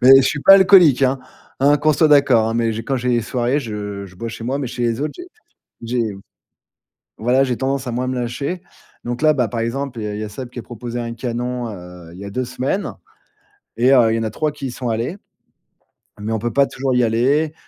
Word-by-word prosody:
mais 130 +2 +9
je 135 - +6
suis 150 - -1
pas 195 - +8
alcoolique, 185 -8 +6
hein! 135 0 +2 0.4
Hein 145 +2 +5
qu'on 155 +1 +2
soit 155 +2 +3
d'accord, 135 -6 +4
hein, 115 - -2
mais 115 -1 +1
j'ai 110 +1 -4
quand 135 - -1
j'ai 125 0 -1
des 120 -1 +2
soirées, 125 +4 -1
je 105 -4 -6
je 95 - -16
bois 115 +5 -5
chez 115 0 -8
moi, 130 +4 -1
mais 140 - -3
chez 120 0 -5
les 115 0 0
autres, 150 - -2
j'ai 355 - -9 0.6
j'ai 115 -2 -1 1.1
voilà, 125 +4 +3
j'ai 125 -2 -1
tendance 135 +1 -2
à 125 - -3
moins 125 +2 -2
me 130 - -2
lâcher, 140 +9 -3 0.4
donc 120 0 -4
là, 155 0 +4
bah, 125 -4 +1
par 115 - -3
exemple, 125 +2 -3
il - - -4
y - - -2
a 105 - -4
il 105 - -5
y 110 - -3
a - - -5
Seb 125 +3 -7
qui 125 - -11
a 120 - -5
proposé 120 0 -7
un 115 -1 -4
canon, 120 +1 -3
heu, 90 -3 -11
il - - -12
y 100 - -8
a 100 - -6
2 125 +5 -2
semaines, 130 +10 -3 0.8
et 125 +3 +4
heu, 115 -4 +5
il - - +1
y - - 0
en - - -2
a 110 - -1
3 150 +8 -2
qui 145 -2 -6
y - - -5
sont 125 0 -4
allés, 115 - -2 1.0
mais 105 +2 -4
on 110 - 0
peut 120 +2 -3
pas 140 - +4
toujours 130 -1 -2
y 125 - +3
aller. 135 +7 +1
125 Hz, 260 wpm, -20 LUFS, 115-135 Hz, 1.1 s, mais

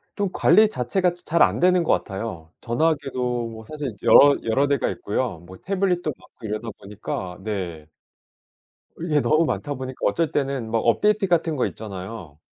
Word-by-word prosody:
좀 200 -1 -1
관리 215 +6 +5
자체가 180 - 0
자 175 - -17
잘 170 +2 +1
안 - - +2
되는 180 0 +4
것 - - +3
같아요. 95 -6 -4
전화기도 125 -4 -1
사실 150 -5 -4
여러 145 0 +7
여러 135 +5 +2
대가 140 -3 +1
있고요. 105 -4 -3
뭐 90 +2 -13
태블릿도 185 -4 0
많고 115 - -15
이러다 110 +2 -4
보니까 100 -3 -6
네. 90 -7 -5 1.1
이게 155 -3 +1
너무 155 +3 +3
많다 145 -2 -2
보니까 130 -1 -6
어쩔 165 -2 +1
때는 135 -5 -2
막 115 - +1
업데이트 205 - +2
같은 165 -3 +1
거 130 - +1
있잖아요. 95 -6 -8
130 Hz, 330 characters per minute, -23 LUFS, 110-165 Hz, 1.1 s, 여러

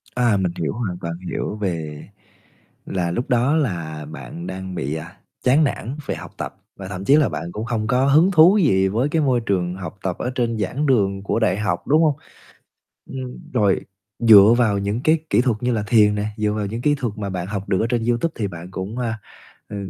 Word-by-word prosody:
À, 120 -4 +3
mình 95 -2 0
hiểu, 80 -4 -1
hoàn 105 -7 -3
toàn 85 0 -3 0.2
hiểu - - -3
về 80 -7 -4 0.8
là 90 -3 -2
lúc 120 +8 -3
đó 125 +4 +2
là 85 - -2
bạn 165 - -8
đang 95 0 -6
bị, 75 -2 -3
à, 80 +5 -8 0.3
chán 135 +5 +4
nản 135 -1 -2
về - - -1
học - - -9
tập, - - -5 0.2
và 95 - -7
thậm 95 0 -6
chí 140 - +6
là 150 -2 +3
bạn 85 - -5
cũng 105 +4 -5
không 110 -2 -2
có 125 +3 +2
hứng 155 +7 +5
thú 175 +3 +6
gì 95 - +3
với 115 +9 0
cái 160 +1 +1
môi 130 -4 +2
trường 90 -5 -1
học 95 +2 -7
tập 90 -2 -2
ở 125 - -2
trên 115 -3 0
giảng 125 +9 -1
đường 100 -7 +1
của 100 - 0
đại 95 -4 +1
học, 105 0 -2
đúng 155 +4 +4
hông? 150 -3 +3 1.0
Ừm, 130 -2 -8
rồi 105 -6 +2 0.4
dựa 110 -1 +8
vào 110 -5 +2
những 100 +3 -2
cái 160 +1 +4
kỹ - - +4
thuật 120 -4 0
như 125 0 +1
là 110 -3 -1
thiền 105 -1 +4
nè, 105 0 -2
dựa 105 -1 0
vào 105 -1 -2
những 115 +4 -5
kỹ 145 +2 +3
thuật 125 -6 -3
mà 100 -2 -3
bạn 90 -2 -4
học 100 0 -5
được 95 - +1
ở 110 - +1
trên 120 -2 0
YouTube 120 +7 0
thì 105 - -1
bạn 85 0 -9
cũng, 95 +5 -5
a, 115 -3 -2 0.5
ờ, 105 - -7
110 Hz, 225 wpm, -21 LUFS, 95-125 Hz, 1.0 s, dựa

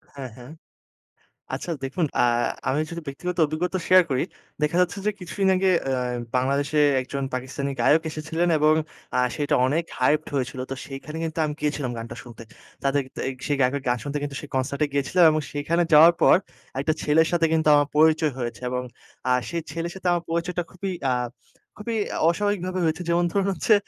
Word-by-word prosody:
হ্যাঁ, 135 -2 -6
হ্যাঁ। 125 +3 -11 1.0
আচ্ছা, - - -4
দেখুন 140 +6 -1
আ - - +6 0.5
আমি 140 - +1
যদি 170 0 -6
ব্যক্তিগত 175 +6 -4
অভিজ্ঞতা 175 +5 -2
শেয়ার 185 0 +7
করি, 130 -2 +1 0.4
দেখা 150 +3 +1
যাচ্ছে 180 +2 0
যে, 210 - +3
কিছুদিন 190 +2 -1
আগে 190 +1 +2 0.2
অ্যা 130 -1 0 0.4
বাংলাদেশে 140 +4 +1 0.2
একজন 135 +2 -4
পাকিস্তানি 130 +2 -3
গায়ক 160 +2 +5
এসেছিলেন, 160 +3 -1
এবং 155 +1 +4 0.4
আ - - +4 0.2
সেটা 145 -1 +1
অনেক 155 +6 +1 0.2
হাইপড 145 +4 +2
হয়েছিল। 130 -1 -2
তো - - -2
সেইখানে 145 +3 -7
কিন্তু 165 0 -3
আমি 150 - -3
গিয়েছিলাম, 145 -4 -1
গানটা 115 +1 -6
শুনতে। 120 -2 -11 0.4
তাদেক 140 0 +2
তায়িক 130 0 -3
সেই 145 - +1
গায়কের 135 +2 +2
গান 125 0 +2
শুনতে, 145 0 -3
কিন্তু 140 -1 -4
সেই 150 - -10
কনসার্টে 140 +3 0
গিয়েছিলাম, 145 +6 +2
এবং 155 0 0
সেইখানে 165 +4 0
যাওয়ার 160 +3 +9
পর - - +7 0.4
একটা 155 +3 +1
ছেলের 160 +2 +4
সাথে 170 -2 +3
কিন্তু 160 -1 +2
আমার 145 -1 +3
পরিচয় 155 -1 +4
হয়েছে, 120 0 -4
এবং 125 0 -2 0.5
আ - - +4 0.2
সেই 170 -1 -2
ছেলের 165 +2 -3
সাথে 185 - -4
আমার 175 -1 0
পরিচয়টা 175 +1 -1
খুবই, 190 +2 -4 0.2
আ - - +3 0.6
খুবই 225 +2 -3 0.3
অস্বাভাবিকভাবে 185 0 -1
হয়েছে। 160 +2 0
যেমন 175 +1 +3
ধরুন 200 -1 +1
হচ্ছে, 200 +5 +2
150 Hz, 180 wpm, -24 LUFS, 135-170 Hz, 1.0 s, যাওয়ার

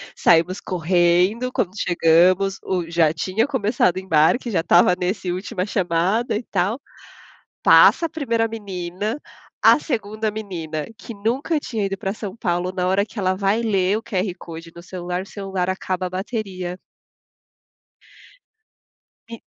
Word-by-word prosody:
Saímos 175 +3 +3
correndo, 180 +6 +1
quando 185 - 0
chegamos, 180 +3 +3
o 175 -3 -2
já 165 -2 +3
tinha 210 - 0
começado 215 -8 +1
o - - -2
embarque, 190 +7 +2
já 175 - +1
estava 175 +2 +5
nesse 180 0 -2
última 185 +1 -3
chamada, 190 +4 0
e 225 - -2
tal. 210 +9 0 0.8
Passa 335 - +6
a - - -6
1ª 230 -8 -1
menina, 205 +2 -4 0.4
a - - +7
2ª 220 -6 -2
menina, 170 -8 -5
que 230 - -9
nunca 250 +9 -1
tinha 220 -7 -3
ido 195 0 -3
pra 195 +2 -3
São 205 -3 -6
Paulo, 180 -3 -1
na 180 -1 -1
hora 195 +2 +2
que 225 - -12
ela 185 -1 +1
vai 200 +3 +1
ler 200 -2 +1
o - - -9
QR 190 -5 -2
Code 165 0 -10
no 170 - -11
celular, 180 0 -4
o - - -11
celular 195 -3 -3
acaba 185 -1 -2
a - - -5
bateria. 185 -3 -4 2.5
E 230 - -8
190 Hz, 145 wpm, -22 LUFS, 180-220 Hz, 2.5 s, a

